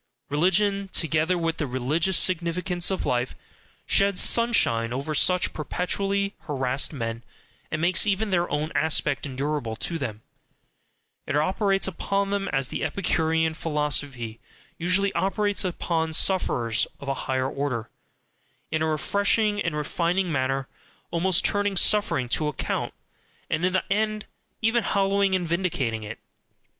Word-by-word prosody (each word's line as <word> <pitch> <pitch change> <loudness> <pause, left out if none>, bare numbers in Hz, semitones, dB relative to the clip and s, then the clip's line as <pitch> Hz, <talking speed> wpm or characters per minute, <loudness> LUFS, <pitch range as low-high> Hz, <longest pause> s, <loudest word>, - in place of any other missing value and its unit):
Religion, 195 +5 +2
together 160 +2 +2
with 165 -1 -1
the 150 - -2
religious 150 +9 +1
significance 175 0 +1
of 190 - -2
life, 125 0 -1 0.5
sheds 200 -1 +3
sunshine 120 - +3
over 140 +5 -3
such 180 +4 +3
perpetually 195 +5 -1
harassed 135 -2 0
men, 115 -5 -4 0.5
and 155 - -2
makes 180 +4 +3
even 205 +1 0
their 175 -1 +1
own 150 +2 -2
aspect 150 -1 +1
endurable 135 -3 -2
to 165 +8 -3
them, 110 -5 -5 1.0
it 140 - 0
operates 195 +5 +1
upon 195 +2 -1
them 200 -1 -1
as 135 -2 -1
the - - -3
Epicurean 160 -1 0
philosophy 145 -7 -1 0.4
usually 190 +3 +2
operates 205 +1 0
upon 165 -3 -1
sufferers 120 - +2
of 140 - -9
a 135 - +1 0.2
higher 130 0 +1
order, 135 -5 -3 0.8
in 155 - 0
a 160 - +1
refreshing 205 +6 +1
and 170 -5 -1
refining 170 +4 0
manner, 135 -1 -1 0.4
almost 175 +2 +2
TURNING 205 -1 +1
suffering 200 -12 +3
TO 150 +5 0
ACCOUNT, 150 - -2 0.6
and 155 +2 0
in 185 0 +2
the 185 - +2
end 215 0 -1 0.4
even 230 +2 +3
hallowing 195 -1 +2
and 180 -2 -1
vindicating 155 -10 -1
it. 110 +1 -7
165 Hz, 135 wpm, -25 LUFS, 140-195 Hz, 1.0 s, sheds